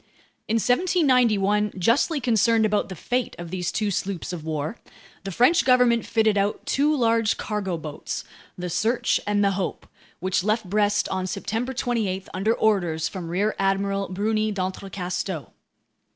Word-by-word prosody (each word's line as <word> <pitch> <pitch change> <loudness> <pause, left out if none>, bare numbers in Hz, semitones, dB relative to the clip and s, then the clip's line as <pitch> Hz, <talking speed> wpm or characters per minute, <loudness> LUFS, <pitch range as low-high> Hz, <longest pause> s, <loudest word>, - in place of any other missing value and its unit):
In 220 - 0
1791, 235 - +2
justly 240 - +2
concerned 230 -2 +3
about 210 -1 0
the 185 - -6
fate 245 +8 -2
of 175 -1 -8
these 180 -1 -2
two 210 -2 -1
sloops 190 -1 -3
of 165 -3 -6
war, 155 +5 -3 0.5
the 195 - -3
French 250 - +4
government 250 -2 +3
fitted 220 -2 +2
out 200 +1 -1
two 295 +2 +2
large 230 -3 +2
cargo 200 -5 -3
boats, 155 -2 -6 0.3
the 180 0 -4
Search 225 +7 +1
and 205 0 +2
the 200 - +3
Hope, 190 -1 -3 0.3
which 185 0 0
left 215 0 0
Brest 205 +1 +1
on 185 -1 -2
September 220 +6 -3
28 225 -7 -2
under 215 +5 +1
orders 175 -7 +1
from 180 -4 -6
Rear 200 +5 0
Admiral 195 0 0
Bruni 215 +3 0
d'Entrecasteaux. 185 - -4
205 Hz, 150 wpm, -24 LUFS, 185-230 Hz, 0.5 s, French